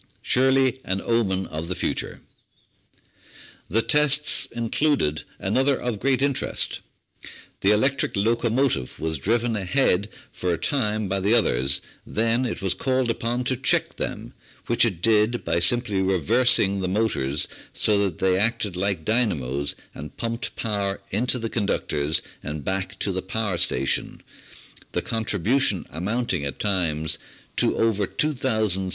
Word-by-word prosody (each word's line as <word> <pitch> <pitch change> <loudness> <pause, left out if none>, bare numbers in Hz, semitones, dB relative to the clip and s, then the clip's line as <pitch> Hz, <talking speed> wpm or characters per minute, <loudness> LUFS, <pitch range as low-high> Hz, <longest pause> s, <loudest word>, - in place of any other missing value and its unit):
Surely 130 0 +3
an 95 +1 -1
omen 95 -4 0
of 80 +2 -6
the 90 - -3
future! 90 - -3 1.5
The 110 +5 +1
tests 150 -1 +3
included 115 - 0 0.2
another 130 +7 +1
of 120 -4 -3
great 135 +2 +1
interest. 140 -2 +1 0.8
The 100 - +2
electric 130 +6 +2
locomotive 115 - 0
was 80 -2 -2
driven 115 - 0
ahead 100 -1 +1 0.2
for 90 - -2
a 85 - 0
time 110 - -1
by 95 +1 -1
the 100 +5 +2
others, 70 - +2 0.2
then 115 +3 0
it 110 - -5
was 95 - +1
called 130 -2 0
upon 120 +2 -2
to 130 +1 0
check 130 +1 +1
them, - - -4 0.3
which 120 0 +3
it 95 -7 -3
did 110 +2 +2
by 85 - +1
simply 105 +1 +2
reversing 100 - +3
the 95 - -1
motors 90 -9 0 0.2
so 105 -2 +3
that 95 -5 0
they 95 -1 +2
acted 105 -3 0
like 95 -3 -1
dynamos 70 - 0 0.2
and 75 - -9
pumped 115 +1 -4
power 100 -3 -2
into 125 +5 0
the 115 -2 -3
conductors 80 -9 0 0.2
and 75 0 -6
back 95 0 -3
to 100 - -1
the 95 0 -2
power 95 -1 -2
station, 70 -6 0 0.7
the - - -1
contribution 110 - 0
amounting 95 0 -2
at 70 -2 -4
times 85 -6 0 0.4
to - - +2
over 105 -3 +1
2,600 140 -4 -1
horse 110 -5 +1
power. 95 -1 -3
105 Hz, 145 wpm, -24 LUFS, 90-120 Hz, 1.5 s, Surely